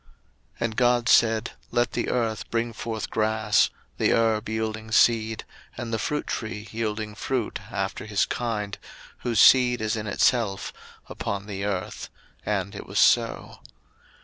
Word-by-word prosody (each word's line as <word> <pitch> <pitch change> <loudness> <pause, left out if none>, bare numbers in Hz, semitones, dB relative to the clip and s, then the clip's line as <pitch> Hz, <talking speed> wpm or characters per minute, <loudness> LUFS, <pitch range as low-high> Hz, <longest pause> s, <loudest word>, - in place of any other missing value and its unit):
01:001:011 - - -32 0.5
And 115 -2 -1
God 120 -1 +3
said, 110 -1 +4 0.2
Let 120 -1 +1
the - - -2
earth 115 -3 -1
bring 115 0 -1
forth 110 -2 -5
grass, 110 -1 +2 0.3
the - - +3
herb 110 -1 +1
yielding 110 0 -3
seed, 110 -1 +3 0.3
and 120 -2 -5
the 110 - 0
fruit 150 +6 -2
tree 110 -1 -4
yielding 110 -1 -3
fruit 120 +1 -2
after 95 +2 -3
his 105 -2 +2
kind, 105 -4 -3 0.4
whose 115 -4 0
seed 125 0 +6
is 110 +1 -1
in 105 -1 -4
itself, 105 -1 +1 0.3
upon 100 0 -4
the 100 -1 -4
earth: 95 -3 -3 0.3
and 100 -2 -2
it - - -8
was - - -5
so. - - +2
110 Hz, 150 wpm, -25 LUFS, 105-115 Hz, 0.5 s, seed